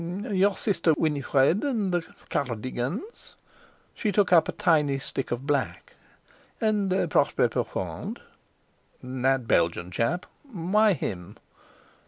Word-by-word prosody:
"Your 195 Hz, 0 st, +2 dB
sister 170 Hz, -6 st, +2 dB
Winifred, 145 Hz, +2 st, +2 dB
and 225 Hz, -9 st, 0 dB
the 175 Hz, -, +2 dB, 0.3 s
Car 140 Hz, -, 0 dB
r 120 Hz, -, -2 dB
digans"—she 135 Hz, -, -6 dB
took 195 Hz, -2 st, +2 dB
up 165 Hz, -, +5 dB
a -, -, +1 dB
tiny 155 Hz, -8 st, +2 dB
stick 135 Hz, 0 st, -4 dB
of 120 Hz, +3 st, -3 dB
black—"and 200 Hz, -, -3 dB, 0.2 s
Prosper -, -, +3 dB
Profond." -, -, -4 dB, 0.8 s
"That 130 Hz, -1 st, 0 dB
Belgian 85 Hz, 0 st, +1 dB
chap? 115 Hz, -, -1 dB, 0.3 s
Why 205 Hz, +3 st, +3 dB
him?" 95 Hz, -, -5 dB
155 Hz, 110 wpm, -26 LUFS, 130-200 Hz, 0.8 s, up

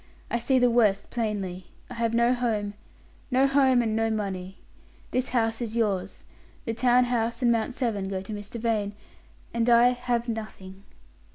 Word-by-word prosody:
I 235 Hz, -, +1 dB
see 260 Hz, +3 st, +2 dB
the 245 Hz, -1 st, +4 dB
worst 215 Hz, -4 st, +2 dB
plainly. 200 Hz, -6 st, -3 dB, 0.2 s
I -, -, -9 dB
have 230 Hz, -1 st, -1 dB
no 235 Hz, +1 st, +4 dB
home, 220 Hz, -5 st, -1 dB, 0.6 s
no 260 Hz, +1 st, +3 dB
home 265 Hz, -3 st, +4 dB
and 220 Hz, -1 st, -1 dB
no 225 Hz, 0 st, +1 dB
money. 195 Hz, -3 st, -4 dB, 0.5 s
This 255 Hz, 0 st, -1 dB
house 225 Hz, -2 st, 0 dB
is 230 Hz, -1 st, -4 dB
yours; 195 Hz, -4 st, -1 dB, 0.4 s
the 230 Hz, -, -2 dB
town 245 Hz, +2 st, +4 dB
house 235 Hz, 0 st, -1 dB
and 240 Hz, -, +4 dB
Mount 230 Hz, +2 st, 0 dB
Severn 215 Hz, -7 st, -1 dB
go 190 Hz, -1 st, -3 dB
to 195 Hz, +3 st, -7 dB
Mr. 205 Hz, +3 st, -7 dB
Vane; 215 Hz, -3 st, -1 dB, 0.6 s
and 235 Hz, +1 st, +1 dB
I 240 Hz, +1 st, +6 dB
have 245 Hz, -1 st, -1 dB
nothing." 200 Hz, -4 st, -7 dB
230 Hz, 170 wpm, -26 LUFS, 205-245 Hz, 0.6 s, I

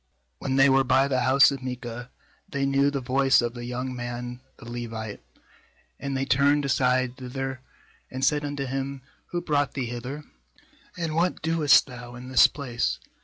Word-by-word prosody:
3When 135 Hz, 0 st, -1 dB
they 135 Hz, +1 st, +7 dB
were 135 Hz, 0 st, +4 dB
by 135 Hz, +1 st, +3 dB
the 130 Hz, -2 st, +1 dB
house 130 Hz, +3 st, +5 dB
of 135 Hz, -2 st, -5 dB
Micah, 125 Hz, -1 st, -6 dB, 0.4 s
they 140 Hz, -1 st, -1 dB
knew 140 Hz, +1 st, +3 dB
the 140 Hz, -1 st, -3 dB
voice 135 Hz, +1 st, +3 dB
of 120 Hz, -1 st, -1 dB
the 120 Hz, -1 st, -7 dB
young 125 Hz, +1 st, -4 dB
man 120 Hz, 0 st, -5 dB, 0.2 s
the -, -, -13 dB
Levite; 115 Hz, -3 st, -6 dB, 0.8 s
and 140 Hz, -1 st, -3 dB
they 135 Hz, -, -1 dB
turned 140 Hz, +2 st, +3 dB
aside 130 Hz, -1 st, +1 dB
thither, 130 Hz, 0 st, -5 dB, 0.5 s
and 130 Hz, +1 st, -1 dB
said 150 Hz, +1 st, +2 dB
unto 145 Hz, -1 st, -3 dB
him; 135 Hz, 0 st, -4 dB, 0.2 s
'Who 175 Hz, -, -3 dB
brought 145 Hz, -4 st, 0 dB
thee 135 Hz, -3 st, -1 dB
hither? 125 Hz, +5 st, -6 dB, 0.7 s
and 165 Hz, -3 st, -2 dB
what 170 Hz, +3 st, 0 dB
doest 160 Hz, -3 st, +5 dB
thou 125 Hz, -2 st, -10 dB
in 125 Hz, +1 st, -9 dB
this 130 Hz, -, +7 dB
place? 125 Hz, -5 st, -2 dB
130 Hz, 170 wpm, -26 LUFS, 125-140 Hz, 0.8 s, they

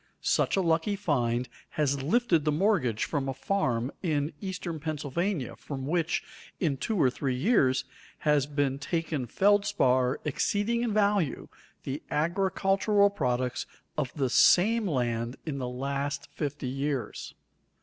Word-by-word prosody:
Such -, -, +2 dB
a -, -, +3 dB
lucky 165 Hz, +4 st, +1 dB
find 125 Hz, -, 0 dB, 0.3 s
has 140 Hz, -2 st, +1 dB
lifted 170 Hz, -, +2 dB
the 150 Hz, -, +2 dB
mortgage 150 Hz, -, +1 dB
from 140 Hz, -3 st, -2 dB
a 135 Hz, -, -3 dB
farm 130 Hz, -11 st, 0 dB
in 155 Hz, -3 st, 0 dB
eastern 180 Hz, -4 st, -4 dB
Pennsylvania, 155 Hz, +1 st, -2 dB
from 135 Hz, -2 st, -6 dB
which, 170 Hz, +3 st, 0 dB, 0.4 s
in 150 Hz, -7 st, 0 dB
two 215 Hz, -, -2 dB
or 130 Hz, -5 st, +4 dB
three 130 Hz, 0 st, -2 dB
years, 130 Hz, -, +2 dB, 0.4 s
has 150 Hz, -2 st, +2 dB
been 140 Hz, -2 st, 0 dB
taken 155 Hz, -3 st, -2 dB
feldspar 130 Hz, -, +2 dB
exceeding 205 Hz, -, 0 dB
in 240 Hz, -2 st, 0 dB
value 205 Hz, -7 st, +1 dB, 0.3 s
the 135 Hz, +2 st, -4 dB
agricultural 195 Hz, +4 st, +2 dB
products 125 Hz, -7 st, -1 dB, 0.3 s
of 140 Hz, -5 st, -1 dB
the 135 Hz, -5 st, 0 dB
same 220 Hz, +4 st, +5 dB
land 120 Hz, -4 st, -1 dB
in 145 Hz, -4 st, -3 dB
the 125 Hz, -1 st, -3 dB
last 140 Hz, +2 st, -3 dB
fifty 145 Hz, -3 st, -4 dB
years. 135 Hz, 0 st, -3 dB
150 Hz, 135 wpm, -28 LUFS, 130-190 Hz, 0.4 s, same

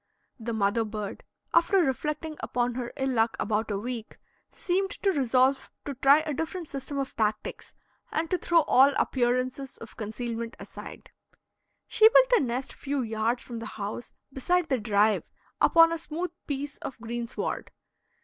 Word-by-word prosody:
The 235 Hz, +1 st, -4 dB
mother 220 Hz, +1 st, +1 dB
bird, 210 Hz, -2 st, -5 dB, 0.3 s
after 340 Hz, +4 st, +4 dB
reflecting 305 Hz, 0 st, 0 dB
upon 245 Hz, 0 st, -1 dB
her 245 Hz, -1 st, -4 dB
ill 265 Hz, -1 st, 0 dB
luck 225 Hz, -2 st, +1 dB
about 215 Hz, +1 st, 0 dB
a 205 Hz, -, -1 dB
week, 230 Hz, +1 st, -5 dB, 0.3 s
seemed 385 Hz, +2 st, -1 dB
to 395 Hz, 0 st, 0 dB
resolve 265 Hz, -2 st, +2 dB, 0.2 s
to 285 Hz, -, -3 dB
try 275 Hz, +3 st, +5 dB
a 310 Hz, -1 st, -3 dB
different 325 Hz, +3 st, -4 dB
system 280 Hz, 0 st, -5 dB
of 270 Hz, -1 st, -3 dB
tactics 215 Hz, -1 st, -2 dB, 0.4 s
and 325 Hz, +1 st, 0 dB
to 365 Hz, -, +1 dB
throw 340 Hz, -1 st, +4 dB
all 275 Hz, 0 st, +5 dB
appearances 255 Hz, +2 st, 0 dB
of 225 Hz, -, -12 dB
concealment 230 Hz, +1 st, -4 dB
aside. -, -, -10 dB, 0.8 s
She 440 Hz, 0 st, +6 dB
built -, -, +5 dB
a -, -, +5 dB
nest 255 Hz, 0 st, -2 dB
few 280 Hz, -2 st, -2 dB
yards 225 Hz, +2 st, -1 dB
from 235 Hz, -2 st, -7 dB
the 225 Hz, -, -6 dB
house 210 Hz, +3 st, -5 dB, 0.2 s
beside 350 Hz, +6 st, +1 dB
the 260 Hz, -, +1 dB
drive, 210 Hz, 0 st, +2 dB, 0.3 s
upon 330 Hz, 0 st, +7 dB
a 330 Hz, -, -3 dB
smooth 335 Hz, +2 st, -4 dB, 0.2 s
piece 285 Hz, 0 st, -4 dB
of 260 Hz, -, -7 dB
greensward. 235 Hz, 0 st, -4 dB
255 Hz, 160 wpm, -28 LUFS, 230-305 Hz, 0.8 s, upon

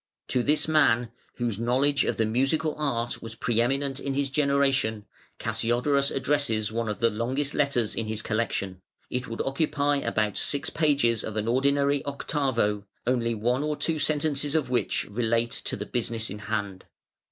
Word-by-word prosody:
To 125 Hz, -, +2 dB
this 150 Hz, +5 st, +2 dB
man, 125 Hz, -7 st, +3 dB, 0.2 s
whose 115 Hz, -4 st, -2 dB
knowledge 135 Hz, +4 st, +2 dB
of -, -, -1 dB
the 115 Hz, -, +2 dB
musical 135 Hz, +7 st, +1 dB
art 120 Hz, -6 st, -2 dB
was 115 Hz, 0 st, -8 dB
pre 115 Hz, 0 st, +1 dB
eminent 135 Hz, +2 st, 0 dB
in 140 Hz, -1 st, -3 dB
his 140 Hz, -1 st, 0 dB
generation, 140 Hz, -7 st, +1 dB, 0.3 s
Cassiodorus 120 Hz, +5 st, +1 dB
addresses 130 Hz, -7 st, 0 dB
one 115 Hz, 0 st, -2 dB
of 105 Hz, -, -3 dB
the 115 Hz, 0 st, +4 dB
longest 130 Hz, +6 st, -1 dB
letters 130 Hz, -6 st, +1 dB
in 115 Hz, -, -3 dB
his 110 Hz, 0 st, -3 dB
collection 100 Hz, -4 st, -2 dB, 0.3 s
(it 125 Hz, 0 st, -2 dB
would 115 Hz, -, -3 dB
occupy 145 Hz, +1 st, +1 dB
about 105 Hz, -6 st, 0 dB
six 145 Hz, +1 st, 0 dB
pages 140 Hz, -7 st, +2 dB
of 110 Hz, -1 st, -5 dB
an 110 Hz, +1 st, -1 dB
ordinary 140 Hz, +3 st, +2 dB
octavo), 130 Hz, -7 st, -1 dB, 0.2 s
only 120 Hz, -2 st, +1 dB
one 120 Hz, +5 st, 0 dB
or 150 Hz, 0 st, -1 dB
two 160 Hz, +1 st, -1 dB
sentences 145 Hz, -1 st, 0 dB
of 140 Hz, -6 st, 0 dB
which 125 Hz, -, 0 dB
relate 115 Hz, +2 st, 0 dB
to -, -, -3 dB
the 105 Hz, -, -5 dB
business 115 Hz, -2 st, -2 dB
in 105 Hz, -, -6 dB
hand. 100 Hz, -3 st, -3 dB
125 Hz, 165 wpm, -27 LUFS, 115-140 Hz, 0.3 s, the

